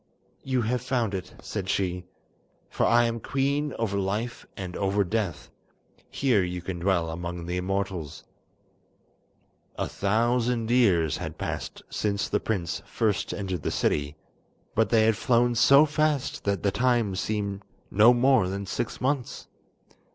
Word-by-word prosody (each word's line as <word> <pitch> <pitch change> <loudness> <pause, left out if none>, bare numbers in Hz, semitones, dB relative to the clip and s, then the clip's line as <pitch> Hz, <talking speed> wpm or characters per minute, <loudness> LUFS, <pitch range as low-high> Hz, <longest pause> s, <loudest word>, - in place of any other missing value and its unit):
"You 130 -2 0
have 120 +2 0
found 125 -5 -1
it," 95 -3 -5
said 95 -3 -4
she, 90 -2 -1 0.7
"for - - +1
I 120 0 +5
am 115 0 -1
queen 140 +4 -1
over 100 -3 -1
life 105 +5 -3
and 90 -2 -6
over 100 +1 +1
death. 90 - -3 0.6
Here 125 -8 +2
you 90 0 -3
can 90 0 -5
dwell 85 -3 +1
among 85 +1 -5
the 90 +1 -2
immortals." 90 -5 -3 1.5
A - - -2
thousand 115 +2 0
years 90 - +3
had - - -6
passed - - -5
since 100 -1 -1
the - - 0
prince 90 -6 -2
first 105 -4 0
entered 95 -4 -3
the - - -1
city, 75 0 0 0.6
but 110 -1 +2
they 115 -2 +4
had 110 -1 +3
flown 120 +1 +2
so 140 +5 +6
fast 150 -2 0
that 100 -3 0
the 100 - +2
time 120 -3 +1
seemed 100 0 -2 0.3
no 110 +4 +7
more 125 -4 +4
than 100 +1 -4
six 115 +4 -4
months. 130 -1 -2
105 Hz, 145 wpm, -26 LUFS, 95-120 Hz, 1.5 s, no